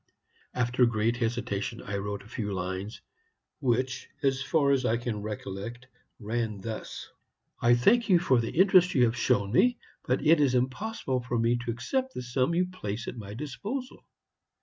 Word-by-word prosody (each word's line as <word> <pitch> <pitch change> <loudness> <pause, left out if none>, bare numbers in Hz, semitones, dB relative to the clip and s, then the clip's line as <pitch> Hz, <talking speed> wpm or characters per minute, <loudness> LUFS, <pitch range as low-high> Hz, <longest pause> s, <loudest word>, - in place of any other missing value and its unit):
After 125 0 +3
great 115 +1 +1
hesitation 115 -4 -2
I 100 - -3
wrote 100 0 -4
a - - -15
few 105 -3 -4
lines, 95 +3 -4 0.6
which, 130 0 -1
as 135 -1 +2
far 140 0 +2
as 135 -1 +2
I 115 -1 +2
can 120 -3 -3
recollect, 105 +3 -6 0.3
ran 110 -1 -2
thus: 110 +2 -6 0.5
"'I 120 +1 +5
thank 225 - +3
you 185 - +7
for 130 -8 +3
the 115 - -3
interest 185 -1 +5
you 130 - +5
have 115 0 +2
shown 100 -5 +1
me, 245 - +4 0.3
but 130 +4 0
it 160 +1 +6
is 135 -3 +3
impossible 130 - -1
for 120 0 -2
me 115 +1 +2
to 120 0 -5
accept 260 - -2
the - - -4
sum 130 +6 0
you 180 +1 +3
place 115 - -5
at - - -5
my 105 -3 -8
disposal. 205 - -5
120 Hz, 170 wpm, -28 LUFS, 110-140 Hz, 0.6 s, you